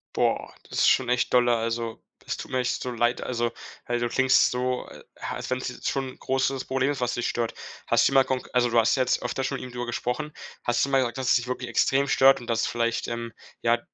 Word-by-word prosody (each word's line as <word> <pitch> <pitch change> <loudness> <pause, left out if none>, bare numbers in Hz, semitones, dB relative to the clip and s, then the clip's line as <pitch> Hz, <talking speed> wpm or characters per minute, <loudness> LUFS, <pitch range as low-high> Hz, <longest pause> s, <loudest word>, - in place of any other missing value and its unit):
Boah, - - 0 0.2
das - - -3
ist - - +6
schon 130 -2 +3
echt 125 0 +1
dolle. 120 -1 +5
Also, 115 0 -3 0.2
das - - -4
tut - - -8
mir 130 - +1
echt 125 0 -1
so 125 - -3
leid. 120 +1 +1
Also, 120 -1 -1 0.3
weil 120 0 -1
du 120 0 -1
klingst 130 0 +4
so, 125 0 -1
a - - -12 0.4
als - - -6
wenn's 130 0 -2
jetzt - - -6
schon 135 -1 -2
'n - - -13
großes 135 0 0
Problem 135 +1 +1
ist, 140 - -4
was 125 -1 0
dich 120 - -1
stört. 115 -1 -2 0.3
Hast - - +4
du - - -4
mal 135 -1 +6
konk 130 -1 -3
also, 120 -1 +2
du 115 - +1
hast 115 +3 +4
jetzt 130 -1 +1
öfter 135 - -2
schon 135 - -2
mit - - -8
ihm 125 - -8
drüber 120 0 -4
gesprochen. 125 +5 -3 0.3
Hast 120 0 +2
du 140 - 0
mal 135 - +3
gesagt, 125 0 -1
dass 130 -2 -1
es - - +6
dich 120 0 0
wirklich 125 -1 -4
extrem 135 +4 +2
stört 135 0 +5
und 120 - -10
dass 115 -1 +1
vielleicht, 115 0 -1
ähm, 115 0 -4 0.3
ja, 120 0 +3
125 Hz, 255 wpm, -26 LUFS, 120-130 Hz, 0.4 s, ist